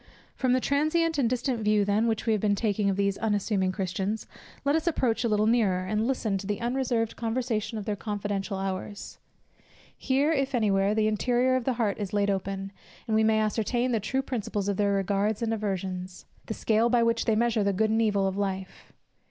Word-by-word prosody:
From 255 -2 +1
the 255 - +3
transient 310 +4 +1
and 240 -4 +2
distant 250 0 -1
view 210 -1 +2
then, 210 +3 +2
which 225 -2 -1
we 225 - +2
have 210 - 0
been 205 -1 +2
taking 205 -1 0
of 195 - -1
these 200 -1 0
unassuming 205 -3 0
Christians, 195 +2 -3 0.4
let 285 +2 +3
us 320 +2 -1
approach 255 -8 +1
a 235 - +1
little 210 0 +2
nearer, 215 -5 +2
and 215 +4 0
listen 220 -7 -1
to 195 - -7
the 205 -1 -2
unreserved 240 -2 -1
conversation 230 -1 -2
of 210 - -5
their 210 - -1
confidential 205 -1 -3
hours. 195 +1 -5 0.8
Here, 275 +4 +1
if 275 -3 0
any 215 -4 +2
where, 195 +2 +2
the 215 -1 +2
interior 245 +4 +2
of 255 -2 -1
the 260 - +1
heart 225 -4 -1
is 205 -2 -4
laid 205 -1 +2
open, 195 0 -3 0.4
and 220 - +1
we 220 - +4
may 220 0 +3
ascertain 230 +3 0
the 225 - +1
true 265 +6 -1
principles 210 -6 -3
of 200 -2 0
their 200 -1 +2
regards 200 +3 0
and 225 -1 0
aversions; 190 -3 -4 0.2
the 220 - -3
scale 225 +1 +2
by 240 -1 +3
which 230 0 +1
they 220 - +2
measure 230 -1 +2
the 200 - +2
good 215 +3 +1
and 225 +1 +2
evil 205 -3 +2
of 190 - -2
life. 195 -1 -4
215 Hz, 210 wpm, -27 LUFS, 200-235 Hz, 0.8 s, we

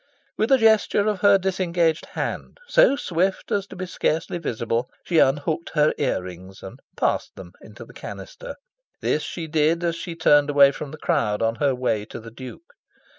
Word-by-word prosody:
With 220 +5 0
a 270 - +7
gesture 220 -3 +3
of 210 -3 0
her 200 +1 +6
disengaged 175 -4 0
hand, - - -4
so - - +5
swift 190 - -1
as 200 -1 0
to - - -11
be 185 0 -5
scarcely 170 -1 -2
visible, 115 -4 -2
she 170 -3 +2
unhooked 145 +4 +1
her 150 0 +3
ear 130 -9 0
rings 95 +1 -11
and 105 +8 -10 0.2
"passed" - - -1
them - - -11
into - - -12
the - - -16
canister. - - -9 0.5
This - - 0
she 170 - -5
did 160 +2 +1
as 170 -1 0
she 170 0 -6
turned 145 -3 +4
away 140 -1 +6
from 145 +1 -7
the 155 - -9
crowd, 105 -7 0
on 115 0 +1
her 140 -3 +1
way 115 -4 -1
to 115 - -9
the 115 0 -11
Duke. 130 - -11
160 Hz, 185 wpm, -23 LUFS, 130-190 Hz, 0.5 s, a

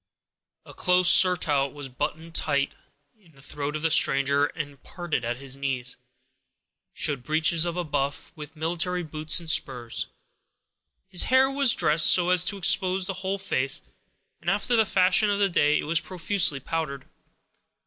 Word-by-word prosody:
A - - -13
close 180 0 +3
surtout 150 -8 +3
was 145 -2 -8
buttoned 155 +5 -6
high 140 -2 0 0.5
in 175 -6 -25
the 135 - -20
throat 145 +1 -5
of 155 - -5
the 165 - +1
stranger, 140 0 +3
and 145 -4 -8
parting 175 -6 -5
at 120 +1 -3
his 135 0 -3
knees, 130 -3 -3 1.0
showed 140 -4 -2
breeches 160 +4 +1
of 170 - -4 0.2
buff, 140 +1 -3
with 150 +1 -11
military 175 +3 -2
boots 155 +1 -1
and 170 - -10
spurs. 120 - -2 1.0
His 190 -2 +1
hair 260 +1 +3
was 275 -3 +3
dressed 155 +2 +4
so 180 0 +4
as 180 -2 +5
to 200 - 0
expose 185 0 +2
the 195 - -4
whole 195 +1 -2
face; 135 -8 -2 0.6
and, 170 - -3
after 210 +6 +1
the 220 -2 +3
fashion 185 +3 +3
of 200 - 0
that 200 -1 +1
day, 150 -1 +3
it - - -3
was 160 +2 +1
profusely 170 -3 0
powdered. 140 -1 -5
160 Hz, 160 wpm, -25 LUFS, 140-180 Hz, 1.0 s, as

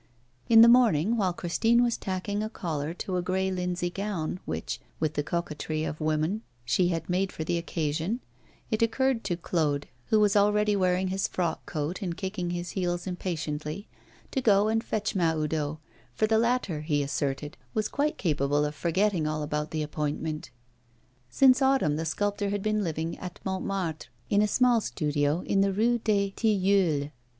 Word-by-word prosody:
In 225 -1 +9
the 230 - +9
morning, 235 -5 +5
while 195 -5 +1
Christine 225 +8 +2
was 235 -1 +1
tacking 195 +2 -3
a 215 - -2
collar 160 -8 -3
to 185 0 -3
a - - +1
grey 190 +1 0
linsey 180 -1 -2
gown 185 -4 -3
which, 80 +1 -4 0.2
with 155 -1 0
the 150 - 0
coquetry 155 -1 -3
of 155 -1 -4
woman, 155 +7 0 0.2
she 175 +9 +2
had 165 -2 -2
made 185 +2 0
for 160 - -5
the 170 +2 0
occasion, 165 +6 -2 0.5
it 220 - 0
occurred 235 +1 +1
to 175 -3 -1
Claude, 150 -5 -1 0.2
who 220 - +3
was 210 -1 +3
already 210 +1 +3
wearing 185 -1 +1
his 190 +1 0
frock 175 -3 -2
coat 155 +6 -3
and 175 -3 -3
kicking 190 -2 -3
his 175 0 -3
heels 175 -2 -2
impatiently, 165 -1 -4 0.4
to 265 - 0
go 210 -3 +4
and 225 +1 +1
fetch 215 - -2
Mahoudeau, 155 -4 0 0.4
for 215 - +2
the 220 0 +3
latter, 235 -9 0
he 150 -2 0
asserted, 140 +1 -2 0.2
was 215 -1 +1
quite 290 +6 -1
capable 145 -3 +1
of 150 - -3
forgetting 175 +1 +1
all 155 0 -2
about 150 +1 -2
the 155 -1 -2
appointment. 150 -1 -3 0.8
Since 260 - +5
autumn, 265 - +3
the 160 +2 -2
sculptor 205 +4 -1
had 200 -1 -2
been 215 -1 +1
living 165 -1 -3
at 180 -1 -7
Montmartre, 190 -4 -2 0.2
in 205 - +4
a 210 - +3
small 245 +1 +3
studio 150 -2 0
in 195 - +1
the 195 0 +3
Rue 235 +5 +2
des 200 -3 +1
Tilleuls. 190 -9 +2
180 Hz, 175 wpm, -28 LUFS, 155-210 Hz, 0.8 s, In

